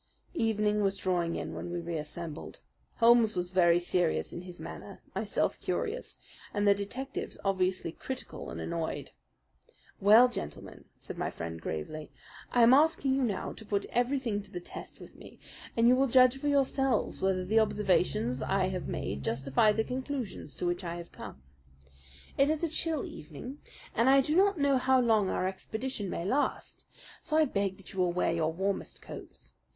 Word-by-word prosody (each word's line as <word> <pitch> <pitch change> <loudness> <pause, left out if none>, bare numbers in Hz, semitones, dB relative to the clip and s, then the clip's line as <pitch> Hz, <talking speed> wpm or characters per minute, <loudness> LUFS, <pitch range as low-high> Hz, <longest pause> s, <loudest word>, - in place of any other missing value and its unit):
Evening 210 - +1
was 195 -1 +1
drawing 175 -3 0
in - - -4
when - - -5
we 175 0 -3
reassembled. 165 -1 -6 0.4
Holmes 230 -2 +5
was 180 0 -2
very 175 -2 +5
serious 175 -1 0
in 175 - -5
his 180 -1 -10
manner, - - -9
myself - - -1
curious, 465 +3 -3 0.4
and 205 0 +2
the 200 - +8
detectives 245 +7 -5
obviously 185 -3 0
critical 260 +9 -7
and - - -6
annoyed. 165 -1 -3 0.9
"Well, 215 +5 +8
gentlemen," 245 - -7
said - - -8
my - - -1
friend 80 0 -6
gravely, 150 - -5 0.4
"I 245 - +5
am 235 +2 +8
asking 285 -2 +4
you 270 - +1
now 225 -6 -1
to - - -11
put 205 -2 -1
everything 245 -4 0
to 205 - -13
the 175 - -4
test 175 - -10
with - - -13
me, - - -13 0.4
and 230 +1 +5
you 250 - +7
will 270 +1 +3
judge 255 0 +6
for 290 - -2
yourselves 270 -2 +1
whether 190 -1 +1
the 220 +4 +3
observations 180 - +1
I 190 -1 +1
have 185 -1 -4
made 70 - -3
justify 135 - +2
the 220 +1 +1
conclusions 255 - -5
to - - -3
which 175 +1 -1
I 170 -1 -4
have 170 -1 -8
come. 65 - -10 1.0
It 275 +1 +5
is 315 +1 0
a 335 - +1
chill 320 -1 -1
evening, 170 - -9 0.3
and 235 +3 +3
I 275 0 +7
do 300 +4 -1
not 395 +1 +4
know 280 -2 +3
how 260 +1 +4
long 220 -5 +3
our 185 - 0
expedition 220 +3 -4
may 170 - -3
last; 265 +9 -1 0.4
so 310 -2 0
I 315 - +6
beg 200 -7 -1
that 195 - -12
you 190 - -5
will 180 -1 +3
wear 175 -1 +1
your 165 -1 +1
warmest 190 +4 -3
coats. - - -9
205 Hz, 175 wpm, -30 LUFS, 175-255 Hz, 1.0 s, the